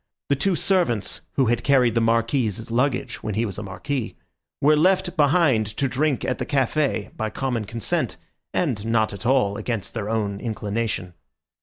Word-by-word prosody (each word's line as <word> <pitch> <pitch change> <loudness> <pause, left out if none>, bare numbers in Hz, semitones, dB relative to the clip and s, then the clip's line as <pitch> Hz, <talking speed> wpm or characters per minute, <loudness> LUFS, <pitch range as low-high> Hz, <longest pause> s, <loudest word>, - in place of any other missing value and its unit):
The 140 - +4
two 185 +7 +1
servants, 165 - +1
who 135 - +2
had 120 0 +1
carried 130 -5 +4
the 115 - +2
Marquis's 115 -1 +1
luggage 125 +2 0
when 105 -2 -3
he 115 +2 +1
was 100 -2 -5
a - - -4
marquis, 115 +6 -4 0.4
were 150 +2 +5
left 185 +3 +2
behind 145 - +3
to 140 - +1
drink 140 +2 0
at 130 - -1
the - - -2
café 135 -4 0
by 110 0 -2
common 120 -1 -2
consent, 115 0 -2 0.3
and 125 - 0
not 110 -2 +2
at 100 +4 -5
all 125 -7 +3
against 115 -5 -3
their 110 -3 -3
own 105 -3 -1
inclination. 105 -4 -3
120 Hz, 170 wpm, -23 LUFS, 110-140 Hz, 0.4 s, were